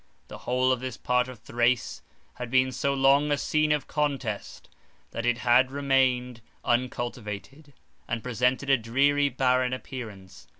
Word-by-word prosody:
The -, -, -9 dB
whole 130 Hz, +1 st, +2 dB
of 130 Hz, -, +1 dB
this 130 Hz, -2 st, -5 dB
part 125 Hz, 0 st, +1 dB
of 130 Hz, -1 st, -9 dB
Thrace 120 Hz, +1 st, 0 dB, 0.3 s
had 125 Hz, -1 st, -7 dB
been 130 Hz, +1 st, +3 dB
so 135 Hz, +3 st, -1 dB
long 140 Hz, +2 st, +3 dB
a 145 Hz, -, +2 dB
scene 155 Hz, +1 st, +1 dB
of 150 Hz, -3 st, +1 dB
contest, 135 Hz, -8 st, -3 dB, 0.4 s
that 115 Hz, +1 st, -3 dB
it 120 Hz, -1 st, +2 dB
had 125 Hz, +2 st, +4 dB
remained 130 Hz, -3 st, +1 dB, 0.2 s
uncultivated, 120 Hz, +3 st, -3 dB, 0.3 s
and 115 Hz, -1 st, -3 dB
presented 125 Hz, +3 st, 0 dB
a 135 Hz, -, +6 dB
dreary, 140 Hz, +5 st, +2 dB
barren 130 Hz, -1 st, +1 dB
appearance. 110 Hz, -8 st, -8 dB
125 Hz, 145 wpm, -27 LUFS, 120-135 Hz, 0.4 s, a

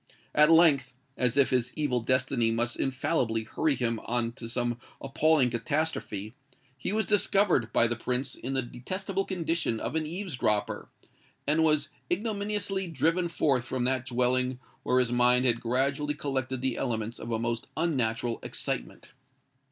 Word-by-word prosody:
At 150 Hz, +1 st, +6 dB
length—as 135 Hz, -5 st, +3 dB
if 140 Hz, -, +4 dB
his 125 Hz, -1 st, +1 dB
evil 145 Hz, -5 st, 0 dB
destiny 130 Hz, 0 st, +2 dB
must 120 Hz, +1 st, 0 dB
infallibly 130 Hz, -4 st, 0 dB
hurry 150 Hz, +6 st, 0 dB
him 115 Hz, -2 st, -1 dB
on 120 Hz, 0 st, -1 dB
to 115 Hz, -1 st, -8 dB
some 120 Hz, 0 st, -1 dB, 0.2 s
appalling 140 Hz, -1 st, +3 dB
catastrophe—he 130 Hz, -, -4 dB
was 220 Hz, +1 st, +1 dB
discovered 195 Hz, -, +2 dB
by -, -, +4 dB
the 120 Hz, 0 st, +1 dB
Prince 125 Hz, +3 st, -2 dB
in 135 Hz, +2 st, -5 dB
the 130 Hz, -, +1 dB
detestable 185 Hz, -, -3 dB
condition 165 Hz, -, -1 dB
of -, -, -4 dB
an 160 Hz, -1 st, -1 dB
eaves 175 Hz, -3 st, -3 dB
dropper, 105 Hz, -3 st, 0 dB, 0.6 s
and 155 Hz, +3 st, +3 dB
was 155 Hz, -1 st, +2 dB, 0.2 s
ignominiously 200 Hz, -1 st, -1 dB
driven 165 Hz, +3 st, +1 dB
forth 140 Hz, -7 st, +1 dB
from 125 Hz, 0 st, -2 dB
that 130 Hz, 0 st, 0 dB
dwelling 125 Hz, +1 st, +1 dB, 0.2 s
where 125 Hz, -, +1 dB
his 125 Hz, -2 st, +1 dB
mind 125 Hz, +1 st, +4 dB
had 120 Hz, -2 st, +2 dB
gradually 140 Hz, +5 st, 0 dB
collected 130 Hz, -3 st, -3 dB
the 130 Hz, -2 st, 0 dB
elements 115 Hz, -2 st, -3 dB
of 115 Hz, -, -7 dB
a 115 Hz, -, +1 dB
most 115 Hz, 0 st, -2 dB
unnatural 120 Hz, -8 st, 0 dB
excitement. -, -, -5 dB
130 Hz, 150 wpm, -28 LUFS, 120-155 Hz, 0.6 s, At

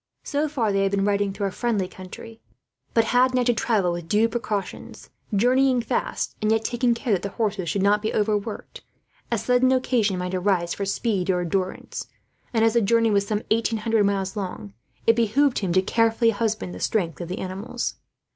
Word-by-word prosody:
So 295 Hz, +1 st, -1 dB
far 240 Hz, -8 st, 0 dB
they 195 Hz, 0 st, +1 dB
had 195 Hz, -, +2 dB
been 195 Hz, 0 st, 0 dB
riding 200 Hz, -1 st, +1 dB
through 200 Hz, +1 st, -3 dB
a 195 Hz, -, -1 dB
friendly 215 Hz, -4 st, -1 dB
country, 190 Hz, +5 st, -11 dB, 0.5 s
but 230 Hz, -, +5 dB
had 255 Hz, +1 st, +4 dB
now 250 Hz, -, +3 dB
to 240 Hz, 0 st, +3 dB
travel 215 Hz, -5 st, +1 dB
with 170 Hz, -1 st, -5 dB
due 215 Hz, +4 st, +3 dB
precautions; 225 Hz, -4 st, -5 dB, 0.2 s
journeying 250 Hz, +4 st, +3 dB
fast, -, -, -2 dB
and 215 Hz, 0 st, +2 dB
yet 225 Hz, 0 st, +1 dB
taking 240 Hz, 0 st, +1 dB
care 230 Hz, -1 st, -1 dB
that 185 Hz, -, +1 dB
the 200 Hz, -, -3 dB
horses 200 Hz, -4 st, -2 dB
should 195 Hz, +4 st, 0 dB
not 205 Hz, +1 st, +3 dB
be 215 Hz, -, -1 dB
overworked, 210 Hz, 0 st, -2 dB, 0.5 s
as 230 Hz, -2 st, -1 dB
sudden 250 Hz, +2 st, +3 dB
occasion 240 Hz, -6 st, +1 dB
might 180 Hz, 0 st, -3 dB
arise 180 Hz, -2 st, +1 dB
for 200 Hz, -, -3 dB
speed 195 Hz, -2 st, -1 dB
or 180 Hz, -1 st, +2 dB
endurance; 185 Hz, +2 st, -3 dB, 0.4 s
and 225 Hz, -2 st, +3 dB
as 225 Hz, -, +3 dB
the 235 Hz, -, +3 dB
journey 230 Hz, +2 st, +3 dB
was 200 Hz, -1 st, +2 dB
some 210 Hz, 0 st, -1 dB
eight 230 Hz, +1 st, +3 dB
hundred 225 Hz, -1 st, +1 dB
miles 195 Hz, 0 st, 0 dB
long, 180 Hz, -, -5 dB, 0.3 s
it 230 Hz, -, +5 dB
behoved 240 Hz, +4 st, +2 dB
him 190 Hz, -4 st, -2 dB
to 185 Hz, +1 st, +3 dB
carefully 230 Hz, +2 st, +2 dB
husband 215 Hz, -3 st, -2 dB
the -, -, -8 dB
strength 180 Hz, -6 st, -1 dB
of 175 Hz, -, -5 dB
the 185 Hz, -, -4 dB
animals. 200 Hz, +6 st, -4 dB
215 Hz, 200 wpm, -24 LUFS, 195-230 Hz, 0.5 s, but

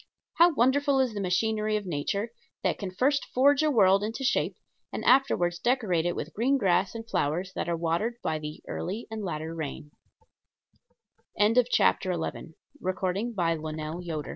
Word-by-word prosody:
How 345 Hz, +1 st, +7 dB
wonderful 275 Hz, +3 st, +3 dB
is 255 Hz, -4 st, +1 dB
the 205 Hz, -, -3 dB
machinery 215 Hz, +3 st, 0 dB
of 210 Hz, -, -6 dB
Nature, 190 Hz, +7 st, -2 dB, 0.3 s
that -, -, 0 dB
can 195 Hz, -, -4 dB
first 270 Hz, +10 st, +1 dB
forge 280 Hz, +3 st, +5 dB
a 310 Hz, -, +3 dB
world 200 Hz, -6 st, +4 dB
into 225 Hz, +5 st, -4 dB
shape 265 Hz, -, +1 dB, 0.4 s
and -, -, -5 dB
afterward 250 Hz, -10 st, +4 dB
decorate 210 Hz, -10 st, +1 dB
it 175 Hz, -, -1 dB
with 160 Hz, -, -5 dB
green 260 Hz, +6 st, +2 dB
grass 195 Hz, -2 st, +1 dB
and 225 Hz, 0 st, -7 dB
flowers 180 Hz, +1 st, -1 dB
that -, -, -3 dB
are 170 Hz, -, 0 dB
watered 170 Hz, +8 st, -1 dB
by 155 Hz, -, -1 dB
the 150 Hz, 0 st, -8 dB
"early 205 Hz, +6 st, -4 dB
and 220 Hz, -1 st, -4 dB
latter 160 Hz, -3 st, -4 dB
rain"! 150 Hz, -2 st, -6 dB, 1.8 s
CHAPTER 185 Hz, -1 st, +3 dB
XII. 170 Hz, -2 st, -3 dB
195 Hz, 145 wpm, -27 LUFS, 170-235 Hz, 1.8 s, How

